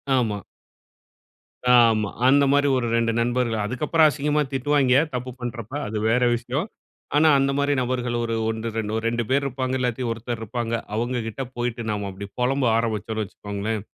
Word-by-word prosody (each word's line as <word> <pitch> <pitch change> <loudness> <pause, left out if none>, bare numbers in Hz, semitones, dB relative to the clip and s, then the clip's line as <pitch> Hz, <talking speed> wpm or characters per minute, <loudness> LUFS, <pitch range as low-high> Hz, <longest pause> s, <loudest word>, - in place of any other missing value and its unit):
ஆமா. 110 -5 0 1.4
ஆமா. 110 -4 +4 0.2
அந்த 140 +2 +5
மாதிரி 145 0 +3
ஒரு 120 -2 -1
2 115 0 +2
நண்பர்கள். 120 -2 0
அதுக்கப்புறம் 150 +7 +3
அசிங்கமா 150 +1 0
திட்டுவாய்ங்க, 135 -1 +3 0.2
தப்பு 125 0 -3
பண்றப்ப. 120 -1 -6
அது 110 - -3
வேறு 125 +2 +3
விஷயம். 125 - -3 0.5
ஆனா 155 +2 +5
அந்த 135 0 +2
மாதிரி 145 0 +2
நபர்கள் 125 -1 -1 0.3
1 110 +1 -3
2- 110 -1 -2
2 120 +1 0
பேர் 140 +2 +2
இருப்பாங்க. 130 -1 -2
இல்லாட்டி 125 0 -1
ஒருத்தர் 115 0 -4
இருப்பாங்க. 115 +1 -3 0.2
அவங்ககிட்ட 120 +1 -2
போய்ட்டு 120 0 -2
நாம 105 -1 -3
அப்படி 95 +1 -7
புலம்ப 130 +2 +1
ஆரம்பிச்சோம்னு 110 -1 -1
வச்சுக்கோங்களேன், 100 +1 -4
120 Hz, 145 wpm, -24 LUFS, 110-130 Hz, 1.4 s, அந்த